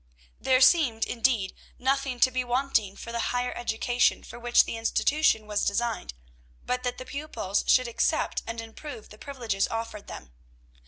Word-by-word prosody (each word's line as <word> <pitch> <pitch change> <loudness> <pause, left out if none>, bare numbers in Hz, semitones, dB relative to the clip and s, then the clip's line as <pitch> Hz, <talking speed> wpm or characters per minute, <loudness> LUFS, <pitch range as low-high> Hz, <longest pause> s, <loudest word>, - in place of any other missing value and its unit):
There 260 -1 +3
seemed, 260 -6 +5
indeed, 230 -5 0 0.2
nothing 265 -1 0
to 255 - +6
be 255 0 -1
wanting 245 -5 0
for 235 - -8
the 235 - -3
"higher 245 0 -1
education" 240 +1 +1
for - - -10
which 240 0 +5
the - - -5
institution 225 +1 +2
was 210 -1 -1
designed, 200 - -1 0.5
but 250 0 -1
that 250 -1 -3
the 255 - -8
pupils 275 -9 -2
should 255 -1 +4
accept 235 - 0
and 230 0 -4
improve 225 +2 -9
the 210 - -14
privileges 235 -8 -2
offered 225 -2 -5
them. 65 - -9
240 Hz, 160 wpm, -27 LUFS, 220-255 Hz, 0.5 s, to